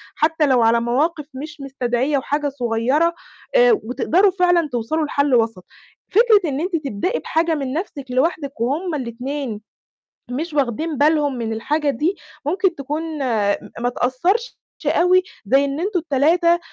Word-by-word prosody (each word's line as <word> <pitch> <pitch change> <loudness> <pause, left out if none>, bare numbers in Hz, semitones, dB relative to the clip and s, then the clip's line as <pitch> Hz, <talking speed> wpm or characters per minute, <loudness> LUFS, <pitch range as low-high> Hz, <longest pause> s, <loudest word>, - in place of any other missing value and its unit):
حتى 315 0 +2
لو 260 -3 +3
على 230 +1 +4
مواقف 295 +6 0
مش 300 +3 -8
مستدعية 265 +1 -1
وحاجة 290 +2 -1
صغيرة 260 +5 +1 0.4
آآ، - - +6
وتقدَروا 355 - +2
فعلًا 350 -3 +3
توصَلوا 250 +7 -1
لحل 285 -2 +1
وَسَط. 225 -5 0 0.4
فكرة 420 -5 +4
إن 275 0 -2
أنتِ 360 +2 -2
تبدئي 265 - -2
بحاجة 325 - 0
من 275 -3 -3
نفْسِك 310 -5 -4
لوحدِك 280 -1 -1
وهُم 305 +8 -1
الاتنين 250 -2 -4 0.7
مش 310 +5 -3
واخدين 290 +3 -1
بالهم 295 -1 +2
من 225 -1 -3
الحاجة 295 +6 -1
دي، 305 +9 0 0.3
ممكن 365 +3 +1
تكون 295 +3 -4 0.2
م 220 -7 +1 0.2
ما 245 - 0
تأثرش 345 - -1 0.3
أوي 365 +1 +4 0.2
زي 270 +6 +3
إن 280 +2 -3
أنتم 380 +1 0
ال3 335 +3 +2
290 Hz, 145 wpm, -20 LUFS, 250-330 Hz, 0.7 s, آآ